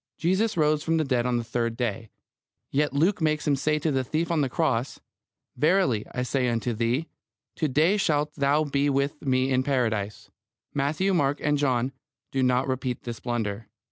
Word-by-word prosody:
Jesus 190 +5 +1
rose 150 -1 +3
from 165 0 +1
the 160 - +2
dead 125 -4 0
on 125 -1 +1
the 120 - -2
third 115 0 -2
day. 115 -2 -3 0.6
Yet 145 +2 +1
Luke 170 +7 +1
makes 155 -1 +1
Him 145 - +4
say 150 +3 +1
to 155 +1 0
the 135 -1 +1
thief 160 +6 -1
on 165 -3 +2
the 135 - 0
cross: 130 -5 -1 0.6
"Verily 150 - +2
I 125 - -2
say 125 0 0
unto 120 +1 -1
thee, 120 +8 0 0.5
to 155 - +1
day 155 +9 +3
shalt 150 -6 +1
thou 145 +2 +2
be 145 -1 +1
with 140 +1 0
me 130 -1 +1
in 130 0 +3
Paradise." 115 -7 -1 0.4
Matthew, 155 +8 0
Mark, 145 -4 +1
and 150 0 +2
John 130 -2 +1 0.4
do 135 - 0
not 125 +1 +2
repeat 130 -1 -2
this 120 -2 -6
blunder. 110 -3 -3
140 Hz, 185 wpm, -26 LUFS, 125-155 Hz, 0.6 s, Him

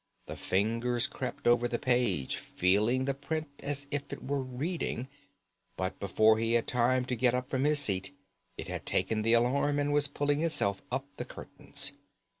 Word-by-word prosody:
The - - -6
fingers 115 +5 +1
crept 125 -2 -5
over 120 0 +4
the 120 - -1
page, 120 - +1
feeling 105 +8 +2
the 140 - +1
print 150 +3 -4
as 140 0 -3
if 145 0 -3
it - - -6
were 140 0 -1
reading; 130 0 -3 0.7
but 95 0 -3
before 110 +3 +4
he 115 0 +1
had 120 -1 +3
time 125 +1 +2
to 125 - -1
get 125 +1 +3
up 125 +1 -3
from 130 +1 +1
his 150 0 +3
seat, 100 -5 0 0.5
it - - -6
had - - -5
taken 110 -1 +1
the 115 +2 +3
alarm 135 +5 +3
and 145 0 +1
was 145 -1 +2
pulling 145 +1 0
itself 100 -12 +1
up 130 +2 -1
the - - -4
curtains. - - -5
125 Hz, 180 wpm, -31 LUFS, 115-140 Hz, 0.7 s, over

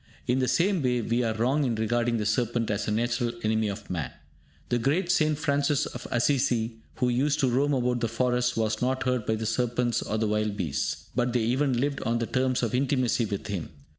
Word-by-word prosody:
In 125 +2 +1
the 130 - +1
same 185 +3 +2
way, 125 -2 +1
we 115 +3 0
are 110 -2 0
wrong 130 +7 +1
in 120 -4 0
regarding 115 +2 0
the 105 - -2
serpent 115 +1 0
as 105 0 -2
a - - 0
natural 115 +1 0
enemy 110 0 +1
of 100 - -5
man. 85 -5 -3 0.6
The 120 - +1
great 165 +9 +1
St. 155 -4 +2
Francis 145 -1 +1
of 120 - -7
Asissi, 120 -3 +1 0.2
who 125 -1 +1
used 140 +5 +1
to 135 - +3
roam 140 +4 +2
about 125 -1 0
the 115 - 0
forests, 125 +1 0
was 110 -1 0
not 130 +1 0
hurt 125 -3 -1
by 110 - +2
the 110 0 -4
serpents 120 +1 0
or 110 - -2
the 110 0 0
wild 105 -1 0
beasts, 75 -8 -2
but 120 -1 +1
they 120 - +2
even 130 +2 +1
lived 140 +1 -1
on 115 0 0
terms 130 +2 0
of 115 - -1
intimacy 130 -2 +1
with 100 -2 -4
him. 100 -7 -4
120 Hz, 215 wpm, -27 LUFS, 110-130 Hz, 0.6 s, to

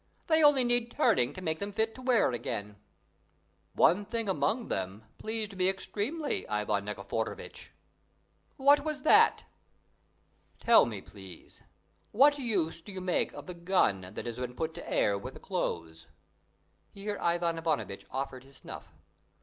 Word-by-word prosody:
They 320 -1 +4
only 290 -3 +6
need 240 -1 +2
turning 220 - +2
to 185 - -8
make 160 -2 -1
them 200 0 -3
fit 220 +2 0
to 255 - -11
wear 250 - +3
again." 105 -3 -5 1.0
"One 195 +4 +4
thing 225 +1 -3
among 190 - 0
them 95 +3 -4 0.2
pleased 220 -2 -4
me 185 0 +2
extremely, 225 +10 -3
Ivan 105 -1 -1
Nikiforovitch." 105 +2 -5 0.9
"What 285 +1 +5
was 305 -3 -3
that?" 430 +7 +5 1.1
"Tell 230 - +6
me, 105 -4 -5
please, 95 -4 -13 0.5
what 285 +6 +5
use 200 - -1
do 205 - -10
you 190 - -6
make 180 -1 0
of - - -9
the 180 - -6
gun 170 - +1
that - - -5
has 120 0 -5
been 125 -1 -5
put 160 +4 -3
to - - -8
air 100 -1 +2
with - - -8
the - - -10
clothes?" 80 -1 -4 0.8
Here 205 +1 -5
Ivan 170 -1 +1
Ivanovitch 155 -12 -2
offered 130 -1 -4
his 135 +1 -17
snuff. - - -10
180 Hz, 150 wpm, -30 LUFS, -, 1.1 s, only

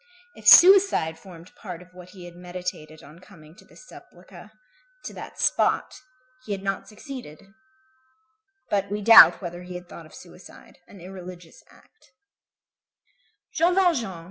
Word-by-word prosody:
If - - -11
suicide 365 - +5
formed 175 -1 -16
part 180 -5 -10
of 180 0 -25
what 180 0 -15
he 185 -2 -14
had 175 -1 -13
meditated 175 -3 -9
on 150 +4 -16
coming 165 -5 -18
to - - -21
this - - -19
sepulchre, - - -17 0.5
to - - -9
that - - -12
spot, - - -1 0.4
he 210 - -6
had 195 -1 -7
not 195 -1 -4
succeeded. 210 - -12 1.1
But 200 -1 -2
we 205 +1 -5
doubt 225 -2 +7
whether 175 0 -8
he 180 0 -11
had 180 0 -10
thought 165 -2 -13
of - - -18
suicide, 180 0 -17
an 195 - -16
irreligious 180 -2 -13
act. 445 - -26
180 Hz, 140 wpm, -23 LUFS, 170-200 Hz, 1.1 s, doubt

